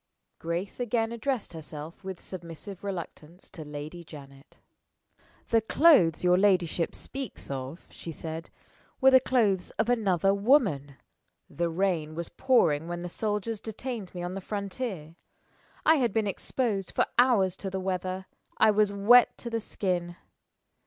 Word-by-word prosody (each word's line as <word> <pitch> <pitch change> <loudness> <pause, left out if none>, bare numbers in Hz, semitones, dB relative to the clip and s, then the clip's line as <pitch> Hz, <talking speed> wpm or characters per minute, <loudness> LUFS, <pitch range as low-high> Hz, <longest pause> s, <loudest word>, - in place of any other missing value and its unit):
Grace 170 +7 -4
again 230 -1 0
addressed 235 -3 -2
herself 155 +2 -8
with 190 -2 -6
submissive 180 +2 -8
reluctance 175 -3 -7
to 160 - -8
Lady 150 +3 -7
Janet. 140 -3 -13 0.9
"The 225 -1 +4
clothes 220 - +5
your 180 0 +4
ladyship 180 -4 +2
speaks 270 - -6
of," 135 +4 -6
she 165 - -8
said, 160 +1 -6 0.5
"were 265 -1 +6
the 260 - +8
clothes 215 -8 +1
of 220 +2 +1
another 195 -5 +2
woman. 200 - +2 0.6
The 170 0 -1
rain 165 -3 -1
was 170 0 -5
pouring 165 - +2
when 175 0 -4
the 175 - -4
soldiers 210 +3 -2
detained 220 -3 -6
me 175 - -4
on 175 +1 -4
the 195 - -5
frontier. 195 -5 -5 0.7
I 320 0 +6
had 245 -5 +1
been 220 -1 +1
exposed 205 0 -2
for - - +2
hours 210 -8 +4
to 195 - -4
the 190 0 -3
weather 185 0 -3 0.3
I 220 - +6
was 210 -1 +3
wet 215 +5 +5
to 235 - -6
the 230 - 0
skin. 175 -4 -2
190 Hz, 145 wpm, -28 LUFS, 170-220 Hz, 0.9 s, the